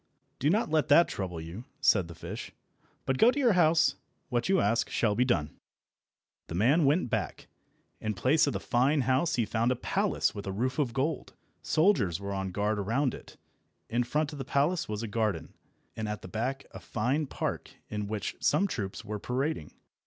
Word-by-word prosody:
"Do 145 - +2
not 205 -2 +1
let 155 -2 +2
that 160 +4 +6
trouble 90 -4 -4
you," 85 +9 -8
said 100 - +3
the 85 - -10
fish, - - -7 0.5
"but 130 -1 0
go 230 - +7
to 255 - 0
your 250 -6 +4
house. 165 -2 +4 0.3
What 120 +2 0
you 190 -1 +4
ask 115 +3 +1
shall 105 -3 +1
be 125 +5 +2
done." 80 - -1 0.9
The 80 - -5
man 135 - +4
went 140 -2 +2
back. - - -2 0.5
In 110 -1 -2
place 145 +10 +3
of 140 - 0
the - - -2
fine 135 +4 +2
house 130 +6 +1
he 115 - +1
found 115 +3 +1
a - - +1
palace - - 0
with 100 -1 -7
a - - -1
roof 130 +7 -2
of 135 -5 +1
gold. 140 +5 -2 0.3
Soldiers 145 - +2
were 100 0 -4
on 95 -1 -2
guard 105 +3 -1
around 120 +6 0
it. - - -11 0.5
In 120 +2 +2
front 150 +5 -1
of 145 - -8
the - - -2
palace 145 +5 0
was 105 +1 -3
a - - -3
garden, 105 -7 -2 0.4
and 110 -1 -3
at 105 -2 -5
the - - -7
back 125 +8 -3
a - - -9
fine 130 +7 -1
park, - - -3 0.2
in 105 -1 -4
which 105 0 -3
some 155 +7 +3
troops 100 - -5
were 105 -1 -4
parading. 125 - -2
120 Hz, 195 wpm, -29 LUFS, 105-150 Hz, 0.9 s, go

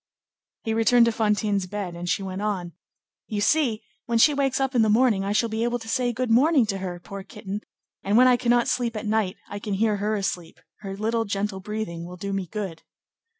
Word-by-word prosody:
He 225 - -1
returned 230 +2 +5
to 230 - +2
Fantine's 210 -3 0
bed, 200 -2 -4
and 175 +1 -5
she 195 - 0
went 190 0 -5
on:— 190 -5 -2 0.6
"You 210 - -3
see, 235 -1 +2 0.2
when 235 -1 +1
she 295 +6 +6
wakes 275 -2 0
up 270 0 0
in 240 - +4
the 220 - +3
morning, 220 -3 +3
I 200 - -2
shall 220 +3 +2
be 220 0 -2
able 240 +1 0
to 225 -2 -11
say 245 +1 +1
good 245 0 -2
morning 270 +2 +5
to 195 -1 -1
her, 180 -2 -5
poor 195 +3 -8
kitten, 195 +1 -7 0.4
and 200 +3 +2
when 255 +1 +7
I 250 - +6
cannot 240 -1 +2
sleep 235 -2 0
at 215 - -4
night, 215 -2 0
I 205 - -6
can 205 -1 -3
hear 210 +1 +1
her 210 +2 0
asleep; 180 -4 -3 0.2
her 195 -2 -6
little 225 +2 0
gentle 200 -1 -2
breathing 210 -4 -5
will 180 +1 -9
do 200 +2 -4
me 195 -2 -2
good." 190 -5 -5
215 Hz, 225 wpm, -25 LUFS, 195-235 Hz, 0.6 s, when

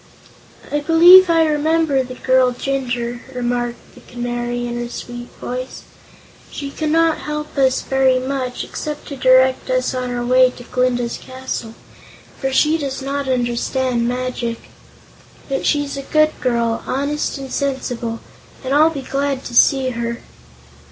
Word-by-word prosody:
"I 295 - +1
believe 345 +4 +8
I 330 -1 +4
remember 310 -2 +1
the 255 0 -7
girl 255 0 +2
Jinjur," 245 -2 -3
remarked 240 -1 -3
the - - -16
Canary, 240 0 -4
in 240 0 -4
her 240 0 -4
sweet 240 0 -8
voice. 255 +1 -6 0.7
"She 280 -1 -6
cannot 320 +2 +1
help 300 0 -5
us 265 -2 +2
very 265 -1 +2
much, 255 -1 -3
except 300 -1 -6
to 280 - -5
direct 260 0 +3
us 255 0 0
on 255 -1 -3
our 240 0 -3
way 255 +1 +5
to 245 - -10
Glinda's 245 -1 -1
castle, 255 -3 -6 0.6
for 270 - -1
she 305 +4 +3
does 275 -2 -4
not 280 0 -3
understand 245 0 0
magic. 245 -2 -3 0.9
But 270 -1 -2
she's 290 -1 0
a 275 - -4
good 305 +2 +2
girl, 235 -2 0
honest 285 +3 -1
and 270 -1 -7
sensible, 245 -4 -3 0.4
and 260 +1 -2
I'll 310 +3 +5
be 285 -4 -6
glad 275 0 -2
to 245 - -7
see 265 0 +4
her." 235 0 -4
260 Hz, 145 wpm, -19 LUFS, 245-280 Hz, 0.9 s, believe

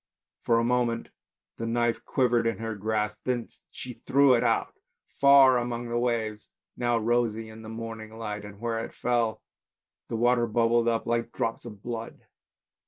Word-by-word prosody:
— - - -65
For 115 - +4
a 115 - +2
moment 120 -1 0 0.5
the 115 - -3
knife 120 0 0
quivered 120 -3 +2
in 115 - -1
her 115 0 -4
grasp, 105 +1 -2
then 125 -2 -1 0.2
she 125 -2 -8
threw 140 -1 +5
it 120 - +3 0.8
far 140 -2 +7
out - - -1
among 120 0 -4
the 120 0 0
waves 110 -3 -2 0.3
now 120 -1 +1
rosy 115 -1 0
in 110 0 -11
the 110 - -9
morning 110 -1 -7
light 105 -2 -5
and 105 -1 -11
where 115 -1 -2
it - - -9
fell 120 -3 0 0.6
the - - -4
water 120 +1 +3
bubbled 115 +1 +2
up 115 -1 +1
like 115 0 -1
drops 115 +1 -3
of 105 -4 -10
blood. 115 -1 -6
115 Hz, 170 wpm, -27 LUFS, 110-120 Hz, 0.8 s, far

